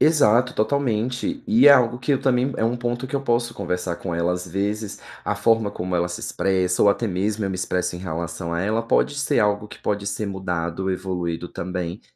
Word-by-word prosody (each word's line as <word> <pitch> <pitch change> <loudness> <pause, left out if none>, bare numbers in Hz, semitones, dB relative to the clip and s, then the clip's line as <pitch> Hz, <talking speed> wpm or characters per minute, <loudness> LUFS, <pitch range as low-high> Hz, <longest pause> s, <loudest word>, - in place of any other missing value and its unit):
Exato, 125 -5 +4
totalmente. 125 - 0
E 220 -9 +6
é - - +11
algo 120 -3 +4
que 140 +3 0
eu 135 - +1
também 130 0 +2
é - - 0
um 115 +2 +1
ponto 120 +1 -2
que 130 - -7
eu 140 - 0
posso 120 -2 0
conversar 90 -2 -2
com 85 0 -5
ela, 85 +1 +1
às 90 0 -4
vezes 100 +3 -3 0.3
a - - -1
forma 115 -2 +2
como 90 -1 -4
ela 85 0 +1
se 90 - -6
expressa 95 -2 0
ou - - +6
até 115 +3 0
mesmo 100 +3 -1
eu 95 - -1
me - - -3
expresso 90 -1 -1
em - - -8
relação 85 -1 -4
a 85 - -1
ela, 110 +4 0
pode 115 +4 +2
ser 140 0 +1
algo 105 0 +1
que - - -11
pode 100 -1 -1
ser 105 +1 -3
mudado, 95 -1 -2
evoluído 90 -2 -3
também, 90 +2 -4
100 Hz, 215 wpm, -23 LUFS, 90-120 Hz, 0.3 s, é